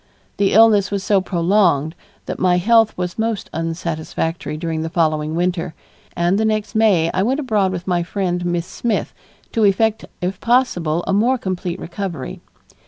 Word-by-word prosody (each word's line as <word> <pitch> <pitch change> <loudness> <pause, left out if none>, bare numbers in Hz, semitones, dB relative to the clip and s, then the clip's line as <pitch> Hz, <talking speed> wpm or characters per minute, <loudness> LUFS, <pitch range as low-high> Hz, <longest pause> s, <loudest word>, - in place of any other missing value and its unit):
The 200 -1 +2
illness 210 -2 +5
was 200 -1 -2
so 200 -2 +3
prolonged 170 -4 +2 0.3
that - - -5
my 180 -1 +3
health 225 +3 +3
was 180 +3 -4
most 220 -3 -2
unsatisfactory 165 -1 -3
during 160 -1 -3
the 160 - -3
following 155 -2 0
winter, 175 -1 -1 0.4
and 175 +3 +2
the - - +2
next 215 -1 -1
May 200 -7 +3
I 190 - +1
went 255 +8 +1
abroad 215 -9 +1
with 180 -1 -5
my 175 -2 +1
friend, 180 0 -2
Miss 175 -1 -1
Smith, 230 +3 -2 0.4
to 225 - +1
effect 215 +2 +2
if 180 +1 -3
possible 175 -10 +1
a 195 - 0
more 240 +6 +3
complete 185 -4 -4
recovery. 170 - -6
185 Hz, 165 wpm, -19 LUFS, 170-215 Hz, 0.4 s, illness